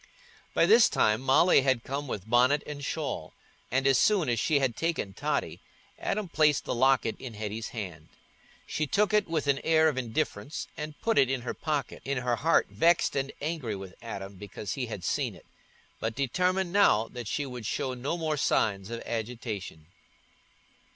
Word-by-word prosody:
By - - +5
this 220 +5 +6
time 110 +2 +2
Molly 135 +5 +5
had 130 -3 +1
come 140 +2 -4
with 105 -5 -5
bonnet 125 +5 +4
and 145 -1 -7
shawl, 145 - -4 0.3
and 135 +2 0
as 135 -2 +5
soon 195 -9 +3
as 120 -2 +1
she 150 - +2
had 135 -4 +1
taken 165 -12 -2
Totty, - - -2 0.4
Adam 210 -1 -2
placed 155 -3 +2
the - - -1
locket 130 -2 +3
in 120 -4 -8
Hetty's 110 +1 -4
hand. 85 -8 -7 0.6
She 155 - -2
took 210 +9 +2
it 210 - +3
with 160 -3 -1
an 140 -1 +2
air 160 -1 +4
of 135 -4 -2
indifference 120 +1 -3
and 150 -1 -7
put 225 -1 +2
it 130 - +4
in 135 -2 -1
her 120 - -4
pocket, 150 -5 -3
in 140 0 -2
her 125 -1 0
heart 165 +6 +3
vexed 170 +1 +3
and 135 0 -1
angry 145 -8 -2
with 95 -2 -8
Adam 100 -4 -7
because 100 0 -6
he 130 -3 -3
had 105 -5 -6
seen - - -1
it, - - -17 0.5
but 110 0 -2
determined 180 +7 0
now 115 - +4
that 120 -3 -7
she 145 - -1
would 125 -5 -6
show 130 -2 -2
no 135 +7 -3
more 155 -2 -1
signs 100 -6 +1
of 115 0 -5
agitation. 110 -8 -5
135 Hz, 185 wpm, -28 LUFS, 115-155 Hz, 0.6 s, this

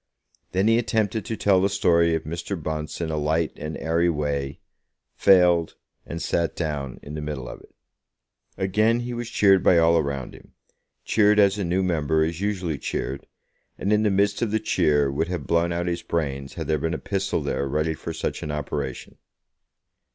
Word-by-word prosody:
Then 95 +3 +1
he 115 +1 +4
attempted 110 -2 -1
to 110 - -4
tell 95 -2 +3
the 100 - +2
story 85 -3 +3
of 80 - -3
Mr. 85 +4 -4
Bunce 75 +1 -4
in 80 -1 -2
a 80 - -2
light 80 +2 0
and 75 0 -6
airy 85 +2 +1
way, 70 -3 -2 0.5
failed, 90 -4 +4 0.3
and 85 - -5
sat 85 -1 -1
down 75 -5 -3
in 75 - -8
the 75 - -4
middle 75 -4 -5
of - - -8
it. - - -19 0.9
Again 110 +5 +2
he 120 0 -4
was 120 -1 -4
cheered 95 -4 +4
by 90 - +5
all 85 0 +5
around 70 -4 -3
him, - - -16 0.5
cheered 105 -1 +4
as 100 0 +4
a - - 0
new 90 +2 0
member 80 -3 +1
is 85 +3 -3
usually 95 -7 -2
cheered, 70 +2 -4 0.5
and 100 - 0
in 105 - +3
the 110 - +2
midst 100 +1 +1
of 120 - +1
the 110 +1 +1
cheer 75 -9 +2
would 75 +4 -1
have 85 -6 -4
blown 85 +1 +1
out 85 +1 -1
his 85 -1 -2
brains 70 -4 -3
had - - -4
there 75 -1 0
been 80 +2 -1
a - - -2
pistol 95 -1 -2
there 70 - -1
ready 75 +3 0
for 75 - -6
such - - -3
an 75 - -5
operation. 75 -1 -4
85 Hz, 195 wpm, -24 LUFS, 75-100 Hz, 0.9 s, by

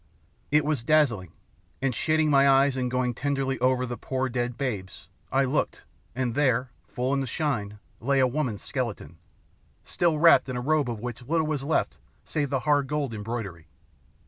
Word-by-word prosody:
It 150 0 +3
was 150 -6 -1
dazzling; 120 - +2 0.5
and 135 -1 0
shading 155 +4 +1
my 140 0 +5
eyes 135 0 +4
and 125 -1 -1
going 125 0 0
tenderly 135 0 -1
over 130 0 +2
through - - 0
the 120 -1 -5
poor 130 0 -2
dead 120 -1 -2
babes, 105 -9 -4 0.2
I 135 +2 +3
looked, 135 +3 -1 0.3
and 125 -2 -1
there, 125 -2 +1 0.2
full 125 +2 -2
in 140 - +1
the 135 - -2
shine, 115 -7 -2 0.2
lay 135 +3 +1
a 130 - +5
woman's 125 -5 -2
skeleton, 105 - -4 0.6
still 170 -3 +1
wrapped 165 -3 +6
in 125 - -3
a - - -1
robe 145 0 +1
of 115 -3 -5
which 120 0 -5
little 160 +6 0
was 155 -3 -2
left 145 +4 -1 0.3
save 145 -3 -2
the 135 -2 0
hard 145 +1 +2
gold 145 -4 -2
embroidery. 105 -6 -5
130 Hz, 180 wpm, -26 LUFS, 120-145 Hz, 0.6 s, wrapped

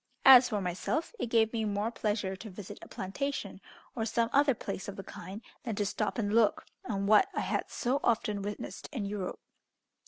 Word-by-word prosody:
As 255 -2 +10
for 210 -4 -1
myself, 190 - -2
it - - -1
gave 225 -1 +3
me 225 -1 0
more 210 +1 -1
pleasure 205 -4 -1
to 215 +4 -9
visit 190 0 -9
a - - -10
plantation, 275 +10 -4 0.3
or 225 - -1
some 230 +1 0
other 280 -2 +4
place 195 -2 -5
of 200 - -5
the 195 - -7
kind, 200 +4 -9 0.2
than 225 -3 -3
to 205 - 0
stop 215 +3 -2
and 205 -2 0
look 225 -2 +3 0.2
on 200 -4 -2
what 210 +1 +5
I - - 0
had - - -1
so 255 +4 0
often 215 -3 +1
witnessed 205 +1 -6
in 240 -9 -3
Europe. 200 -2 -4
215 Hz, 195 wpm, -31 LUFS, 200-235 Hz, 0.3 s, As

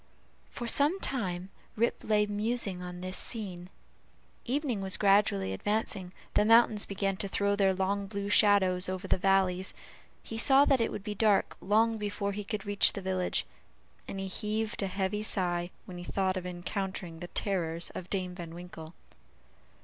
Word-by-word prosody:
For 240 - -6
some 295 +10 +3
time 190 - -3 0.2
Rip 235 +2 0
lay 210 -1 +2
musing 210 -2 -2
on 180 0 -7
this 185 +1 -3
scene; 185 -6 -3 0.8
evening 255 -4 -1
was 190 -1 +3
gradually 195 - +3
advancing; 200 - -2 0.2
the - - +4
mountains 225 -1 +4
began 195 -1 -1
to 200 - -3
throw 200 +1 +1
their 195 -1 +3
long 195 +1 -1
blue 200 -1 -4
shadows 200 -3 +4
over 185 +1 -4
the 185 - +1
valleys; 190 -1 +2 0.5
he 225 - -5
saw 275 +3 +6
that 270 -4 +3
it 230 - 0
would 195 - -6
be 210 0 -4
dark 210 -1 +2
long 220 +3 +2
before 205 -1 -2
he 205 +1 -5
could 210 0 -4
reach 205 0 +4
the 200 - -5
village; 185 -1 -1 0.6
and 195 - -5
he 195 - -3
heaved 215 +4 -2
a 195 - 0
heavy 190 +2 -2
sigh 175 -4 +1 0.2
when 180 -1 -8
he - - -7
thought 190 +1 -1
of 180 -1 -4
encountering 180 -1 -4
the 175 - -6
terrors 170 -4 -1
of 180 - -8
Dame 185 -2 -2
Van 170 -2 -8
Winkle. 175 -2 -10
195 Hz, 170 wpm, -30 LUFS, 185-210 Hz, 0.8 s, saw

